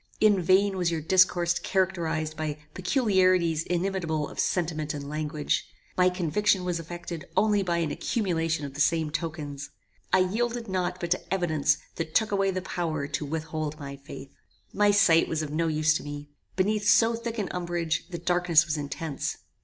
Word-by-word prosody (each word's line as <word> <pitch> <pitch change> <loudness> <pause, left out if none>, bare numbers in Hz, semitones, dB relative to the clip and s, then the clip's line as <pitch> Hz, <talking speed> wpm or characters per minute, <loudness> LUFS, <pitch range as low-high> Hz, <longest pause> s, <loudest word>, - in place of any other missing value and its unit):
In 210 -3 +4
vain 190 +2 +3
was 175 -2 +1
your 165 -1 -1
discourse 175 +1 +3
characterized 170 -5 -1
by 155 -1 -3 0.2
peculiarities 185 - +2
inimitable 170 -3 -1
of - - -10
sentiment 155 -4 -1
and 140 -1 -6
language. 150 0 -1 0.3
My 180 0 +4
conviction 180 +2 +1
was 175 -2 -1
effected 170 0 -7
only 210 -1 +3
by 175 -3 0
an 165 -3 -1
accumulation 165 -8 -1
of 140 - -7
the 145 - -3
same 160 0 +2
tokens. 150 -3 -4 0.4
I 185 - +5
yielded 230 +5 -1
not 185 -1 -2
but 170 -1 -4
to 180 - -1
evidence 155 -6 +2 0.2
which 165 -1 -4
took 220 -1 +3
away 195 -1 +2
the 185 -1 -2
power 160 -6 -2
to 150 +1 -2
withhold 155 0 -4
my 140 -1 -6
faith. 140 -1 -10 0.4
"My 205 0 +3
sight 180 -5 +5
was 160 -1 -1
of 150 - -5
no 165 +2 0
use 155 0 +2
to - - -9
me. 145 0 -7 0.3
Beneath 205 +2 +1
so 230 0 +5
thick 230 0 -4
an 205 -3 -1
umbrage, 170 -2 -2
the 175 - -5
darkness 175 -1 +3
was 155 -1 -2
intense. 145 +1 -4
170 Hz, 175 wpm, -27 LUFS, 155-185 Hz, 0.4 s, I